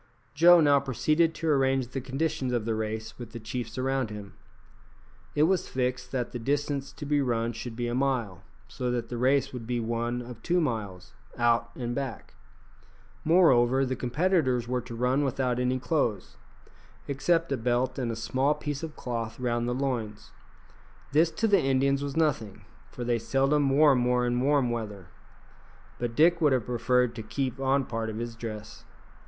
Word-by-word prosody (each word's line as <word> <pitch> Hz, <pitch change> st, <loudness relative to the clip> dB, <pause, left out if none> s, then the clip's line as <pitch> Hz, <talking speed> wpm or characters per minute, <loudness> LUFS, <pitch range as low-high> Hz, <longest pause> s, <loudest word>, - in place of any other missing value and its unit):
Joe 170 Hz, +3 st, +7 dB
now 145 Hz, -2 st, +5 dB
proceeded 155 Hz, +5 st, +1 dB
to 165 Hz, -, -4 dB
arrange 135 Hz, -3 st, +2 dB
the 135 Hz, -, -4 dB
conditions 135 Hz, -1 st, -2 dB
of 120 Hz, -3 st, -1 dB
the 115 Hz, -, 0 dB
race 110 Hz, +1 st, -4 dB
with 120 Hz, -2 st, -9 dB
the 115 Hz, -, -6 dB
chiefs 115 Hz, +1 st, -5 dB
around 130 Hz, -2 st, 0 dB
him. 105 Hz, -2 st, -8 dB, 1.0 s
It 150 Hz, -, +4 dB
was 185 Hz, +2 st, +2 dB
fixed 125 Hz, -1 st, -2 dB
that 125 Hz, -3 st, -2 dB
the 120 Hz, -, -5 dB
distance 140 Hz, +2 st, -1 dB
to 145 Hz, -, -8 dB
be 145 Hz, 0 st, +2 dB
run 115 Hz, -3 st, 0 dB
should 115 Hz, +1 st, -7 dB
be 120 Hz, 0 st, -2 dB
a 120 Hz, -, -2 dB
mile, 125 Hz, -8 st, -1 dB, 0.3 s
so 125 Hz, -, -3 dB
that 120 Hz, -1 st, -2 dB
the 120 Hz, -, -4 dB
race 135 Hz, +2 st, +2 dB
would 120 Hz, -3 st, -7 dB
be 120 Hz, -1 st, -1 dB
one 120 Hz, +1 st, -2 dB
of 120 Hz, -2 st, -10 dB
two 175 Hz, +6 st, +1 dB
miles, 110 Hz, -, -3 dB, 0.2 s
out 120 Hz, 0 st, +2 dB
and 120 Hz, -1 st, -3 dB
back. 135 Hz, -2 st, -5 dB, 0.9 s
Moreover, 135 Hz, -6 st, +4 dB
the 130 Hz, 0 st, -2 dB
competitors 130 Hz, -2 st, +1 dB
were 125 Hz, 0 st, -1 dB
to 115 Hz, -, -9 dB
run 125 Hz, +4 st, +1 dB
without 130 Hz, -2 st, 0 dB
any 125 Hz, +1 st, +1 dB
clothes, 125 Hz, -, -1 dB, 0.7 s
except 165 Hz, +4 st, +1 dB
a -, -, +2 dB
belt 125 Hz, +2 st, 0 dB
and 120 Hz, -3 st, -1 dB
a -, -, -4 dB
small 130 Hz, +6 st, 0 dB
piece 145 Hz, -2 st, -4 dB
of 160 Hz, -2 st, -6 dB
cloth 115 Hz, -2 st, -4 dB
round 120 Hz, -1 st, -1 dB
the 125 Hz, -, -1 dB
loins. 115 Hz, -6 st, -3 dB, 0.8 s
This 155 Hz, +3 st, +4 dB
to 220 Hz, +7 st, -1 dB
the 200 Hz, -4 st, +4 dB
Indians 135 Hz, +1 st, +2 dB
was 140 Hz, +1 st, -4 dB
nothing, 135 Hz, -11 st, -1 dB, 0.2 s
for 125 Hz, -, -7 dB
they 120 Hz, -1 st, 0 dB
seldom 135 Hz, +4 st, +2 dB
wore 145 Hz, +1 st, +5 dB
more 125 Hz, -1 st, +2 dB
in 120 Hz, 0 st, 0 dB
warm 135 Hz, -2 st, +2 dB
weather; 105 Hz, -6 st, -5 dB, 0.9 s
but 120 Hz, -1 st, -3 dB
Dick 170 Hz, +4 st, +4 dB
would 150 Hz, -4 st, +4 dB
have 125 Hz, -4 st, 0 dB
preferred 125 Hz, 0 st, +1 dB
to 115 Hz, -, -6 dB
keep 130 Hz, +4 st, -3 dB
on 135 Hz, 0 st, +1 dB
part 115 Hz, -1 st, -3 dB
of 110 Hz, -, -5 dB
his 115 Hz, 0 st, -5 dB
dress. 110 Hz, -2 st, -8 dB
125 Hz, 180 wpm, -28 LUFS, 115-140 Hz, 1.0 s, Joe